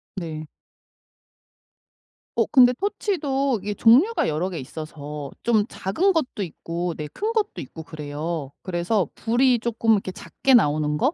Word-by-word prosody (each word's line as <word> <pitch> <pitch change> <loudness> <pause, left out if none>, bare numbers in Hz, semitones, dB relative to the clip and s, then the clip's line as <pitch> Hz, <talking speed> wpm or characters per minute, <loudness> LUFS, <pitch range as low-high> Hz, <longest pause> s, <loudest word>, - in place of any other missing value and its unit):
네. 160 -4 -5 1.9
어 - - +3
근데 250 -2 +6
토치도 280 - -1
이게 205 +1 -3
종류가 280 - +5
여러 160 +4 -1
개 175 - -5
있어서 150 0 -7
좀 220 -3 +3
작은 355 - +1
것도 260 -10 -1
있고 170 0 -4
네 150 -1 -5
큰 430 +2 -2
것도 435 -2 -1
있고 160 - -9
그래요. 150 -1 -5
그래서 180 0 0
불이 240 +2 +2
쪼끔 230 -1 0
이렇게 195 -2 0
작게 265 +7 +1
나오는 150 -6 +2
거? 270 - +2
195 Hz, 270 characters per minute, -24 LUFS, 155-255 Hz, 1.9 s, 근데